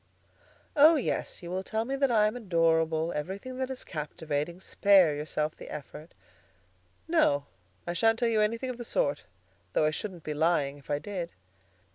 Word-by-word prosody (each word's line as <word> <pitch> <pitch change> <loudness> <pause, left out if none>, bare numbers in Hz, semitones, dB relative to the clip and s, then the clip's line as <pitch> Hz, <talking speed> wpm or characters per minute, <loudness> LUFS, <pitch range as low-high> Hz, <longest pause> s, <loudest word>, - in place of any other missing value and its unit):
"Oh, 310 +3 +8
yes! 260 - -2
You 170 - -6
will 185 +1 -1
tell 220 +3 -2
me 270 +3 -2
that 275 0 +2
I 215 -3 +4
am 215 - 0
adorable; 165 -5 +1
everything 195 - -5
that 260 0 -1
is 260 -1 -5
captivating. 155 +1 -4
Spare 190 -5 +4
yourself 150 +1 -2
the - - -11
effort." 150 +2 -9 0.9
"No; 300 - +3 0.4
I 175 - -2
shan't 225 +6 +3
tell 240 0 +1
you 220 -2 +2
anything 230 +4 0
of 245 - -9
the - - -4
sort, 145 -10 -1 0.5
though 155 - +3
I 155 - +2
shouldn't 180 0 -6
be 150 - -3
lying 150 -3 +1
if 140 - -21
I 145 - +1
did." 180 0 -5
175 Hz, 175 wpm, -29 LUFS, 155-230 Hz, 0.9 s, Oh